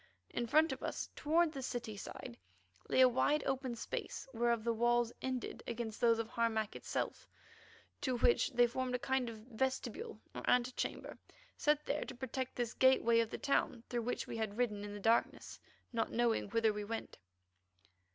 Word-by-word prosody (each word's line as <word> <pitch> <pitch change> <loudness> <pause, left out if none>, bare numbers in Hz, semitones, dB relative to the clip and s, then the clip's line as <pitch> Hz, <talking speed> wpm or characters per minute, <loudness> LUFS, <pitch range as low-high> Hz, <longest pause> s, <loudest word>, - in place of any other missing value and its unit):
In 240 - -2
front 310 +6 +4
of - - -5
us, - - -3
towards 320 +1 +2
the 270 - -5
city 240 -4 -4
side, 160 -10 -7 0.5
lay 260 - +4
a 255 - +9
wide 275 +4 +2
open 260 -2 -1
space, 230 - -5
whereof 235 -1 +1
the 235 0 +1
walls 240 +1 +2
ended 255 -2 -3
against 230 -2 -4
those 230 -1 +5
of 230 -1 -2
Harmac 230 -3 0
itself, - - -3 0.7
to 255 -3 0
which 470 - +4
they 245 0 +6
formed 250 +1 -1
a - - +2
kind 260 -1 0
of 225 - -7
vestibule 260 - -3
or - - -5
antechamber 250 0 0 0.4
set 300 0 +2
there 295 - -1
to - - -8
protect 260 0 -4
this 240 -2 -2
gateway 245 -3 +5
of 230 -1 +1
the - - -4
town 250 -4 0
through 240 -1 -1
which 245 +2 -2
we - - -5
had 220 -2 -2
ridden 210 -5 0
in 205 0 -6
the - - -6
darkness, 225 +3 +1 0.3
not 230 - 0
knowing 235 -3 +1
whither 225 0 +3
we 210 0 -4
went. 225 +2 -5
240 Hz, 180 wpm, -36 LUFS, 225-260 Hz, 0.7 s, a